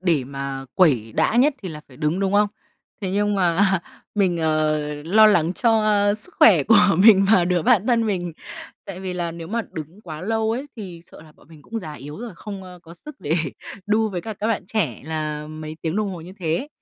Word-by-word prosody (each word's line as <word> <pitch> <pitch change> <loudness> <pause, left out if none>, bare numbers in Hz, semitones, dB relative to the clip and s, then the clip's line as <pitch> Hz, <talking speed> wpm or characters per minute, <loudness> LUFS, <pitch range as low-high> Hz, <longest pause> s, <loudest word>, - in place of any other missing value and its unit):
để 165 -8 +1
mà 135 0 -5
quẩy 125 - +3
đã 230 - +1
nhất 280 +4 +4
thì 185 - -5
là 150 -2 -8
phải 125 - -16
đứng, 155 +5 -1
đúng 195 -1 0
không? 205 +1 +4 0.5
Thế 190 -3 -3
nhưng 205 +1 +1
mà 175 -2 +1 0.6
mình, 190 -4 +2
ờ, 155 -1 +1 0.2
lo 215 +7 +5
lắng 175 -5 +3
cho 225 +1 +2 0.3
sức 215 - -4
khỏe 180 -10 +7
của 225 - +5 0.2
mình 195 -1 +7
và 185 -5 +5
đứa 175 -1 +1
bạn 235 -3 +3
thân 230 -3 +2
mình. 175 -4 -2 0.5
Tại 185 -1 -8
vì 185 -1 -4
là 175 -2 -3
nếu 165 0 -8
mà 230 +3 -1
đứng 160 +6 -8
quá 155 -6 -8
lâu 220 +3 0
ấy 260 +5 -4
thì 180 -6 -8
sợ - - -13
là 155 -1 -17
bọn - - -24
mình 155 -3 -16
cũng 225 +7 -5
già 155 -7 -7
yếu 150 +3 -9
rồi, 240 -2 -7
không 200 -2 -8 0.2
có 165 - -13
sức 290 - -13
để 155 +3 -1 0.5
đu 215 +1 +2
với 180 -3 -4
cả 220 +3 -6
các 210 - -3
bạn 225 -5 -1
trẻ 185 - -2
là 155 -1 -4
mấy 155 0 -8
tiếng 165 +3 -2
đồng 210 -2 0
hồ 180 -3 -7
như 175 +3 -11
thế. 175 - -2
180 Hz, 225 wpm, -22 LUFS, 155-215 Hz, 0.6 s, khỏe